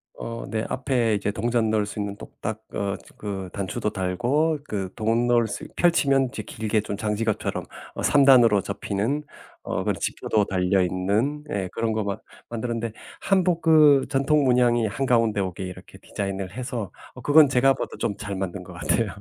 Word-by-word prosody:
어 115 0 -6
네 110 +1 -1
앞에 125 -4 0
이렇게 100 0 0
동전 115 +1 0
넣을 105 -1 +2
수 105 - -7
있는 100 -1 -3
똑딱 110 0 -6
어 100 -1 -1 0.2
그 95 -3 -5
단추도 100 +1 -2
달고 125 - 0
그 95 -3 -3
돈 115 +2 +1
넣을 120 -2 +3
수 - - -6
있 - - -11
펼치면 140 -6 +3
이제 110 - -5
길게 110 +1 -1
좀 100 -1 -5
장지갑처럼 110 0 -1 0.3
어 - - -4
3 145 -1 +5
단으로 120 -7 +6
접히는 100 +8 -2 0.4
어 - - -2
그런 - - -1
지퍼도 105 -2 0
달려 95 0 +1
있는 100 +11 0
예 95 -6 -1
그런 115 -1 -1
것 110 0 -1
막 100 -1 -3 0.3
만들었는데 115 0 -3 0.3
한복 180 -3 +2
그 150 -4 +6
전통 145 +2 +2
문양이 120 -3 +3
한가운데 115 -2 +1
오게 95 -1 -4
이렇게 90 -1 -9
디자인을 95 -2 -4
해서 120 -2 -5 0.2
어 - - -10
그건 145 -1 +6
제가 135 +1 +4
봐도 - - -5
좀 105 -3 -1
잘 100 -2 -5
만든 95 0 -4
것 90 0 -11
같아요. 110 +5 0
110 Hz, 335 characters per minute, -24 LUFS, 100-130 Hz, 0.4 s, 단으로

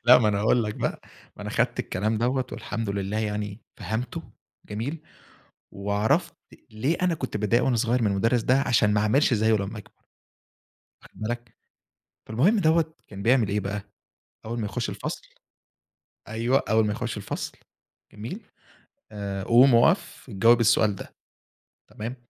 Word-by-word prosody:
لأ 125 +1 +9
ما 110 -4 +2
أنا 100 - +1
هاقول 115 +2 +3
لك 105 - -3
بقى، - - -2 0.4
ما - - -8
أنا - - -5
خدت - - 0
الكلام 105 +4 -1
دوّة 125 +2 0
والحمد 115 -3 -4
لله 100 +2 -2
يعني 105 -1 -3 0.2
فهمته، 110 +4 -4 0.4
جميل؟ 130 +10 -4 0.7
وعرفت 100 +2 0 0.3
ليه 130 +10 -1
أنا 180 -2 +2
كنت 130 -7 -4
باتضايق 105 +4 +2
وأنا 130 - +2
صغيّر 120 +2 +1
من 110 - +2
المُدرّس 115 +5 +2
ده 130 +4 +3
عشان 115 -6 +3
ما 105 - +2
أعملش 130 +6 +3
زيه 110 0 +3
لما 100 +1 -3
أكبر 105 - -11 1.1
واخد - - -17
بالك؟ 120 +1 -5 0.7
فالمهم 165 - +3
دوّة 160 -1 +2
كان 100 -1 -8
بيعمل 120 -3 +3
إيه 105 +1 0
بقى؟ 100 +1 -3 0.6
أوّل 115 +1 -3
ما 105 - -2
يخش - - -3
الفصل - - -5 1.1
أيوه 115 +5 +1
أوّل 110 0 +4
ما 105 - 0
يخش 115 +1 -3
الفصل 105 - -4 0.6
جميل؟ 115 - -7 0.7
آآ 100 -2 -4
قوم 120 +3 +6
أقف، 115 - +2
جاوب 115 +5 +4
السؤال 110 -2 +3
ده، - - -10 0.8
تمام؟ 115 +4 -6
110 Hz, 155 wpm, -26 LUFS, 105-125 Hz, 1.1 s, لأ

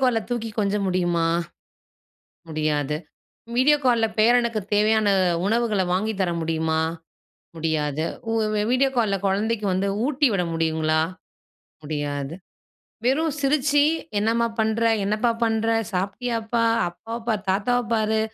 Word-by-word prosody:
கால்ல 245 -3 +3
தூக்கி 230 -2 -2
கொஞ்ச 200 -1 +1
முடியுமா? 175 -2 +1 1.2
முடியாது. 150 -2 -1 0.6
வீடியோ 295 +4 +5
கால்ல 235 -2 +4
பேரனுக்குத் 230 -2 +2
தேவையான 215 0 +3 0.4
உணவுகள 220 -2 +1
வாங்கி 215 +4 0
தர 180 - +1
முடியுமா? 160 0 0 0.8
முடியாது. 155 -2 -1 0.3
உ - - 0 0.4
வீடியோ 265 +1 +3
கால்ல 215 -4 +2
குழந்தைக்கு 210 +2 0
வந்து 195 +2 0 0.2
ஊட்டி 290 0 +2
விட 180 -2 +1
முடியுங்களா? 160 -1 +1 0.8
முடியாது. 145 0 -3 0.7
வெறும் 295 +3 +1
சிரிச்சு, 285 +1 +3 0.4
"என்னம்மா 230 +2 +1
பண்ற? 220 +1 0 0.2
என்னப்பா 215 +4 +1
பண்ற? 225 0 0 0.2
சாப்பிட்டியாப்பா? 225 +4 -1 0.2
அப்பாவ 225 +7 -7
பார், 210 -3 0
தாத்தாவ 245 +6 +1
பாரு, 220 -1 +1
215 Hz, 110 wpm, -23 LUFS, 170-235 Hz, 1.2 s, வீடியோ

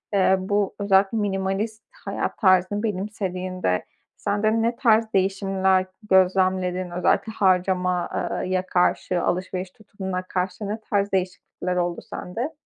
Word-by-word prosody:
ııı, 190 -1 +4
bu 205 -1 +1
özellikle 200 +1 +3
minimalist 205 +2 -2 0.2
hayat - - -3
tarzını 185 +1 +3
benimsediğinde 185 - -2 0.3
sende 215 +2 +1
ne 230 +1 +1
tarz 225 -3 +3
değişimler 190 -1 +2 0.2
gözlemledin? 185 -1 +2
Özellikle 180 +5 +1
harcama 180 -2 +1 0.4
eee, 185 - -5
ya 185 0 0
karşı, 180 0 +1
alışveriş 185 0 -2
tutumuna 190 -3 -5
karşı 185 +2 -3
ne 210 +2 -3
tarz 200 0 +1
değişiklikler 180 -1 -2
oldu 175 -1 -1
sende? 235 - -4
190 Hz, 120 wpm, -24 LUFS, 185-205 Hz, 0.4 s, ııı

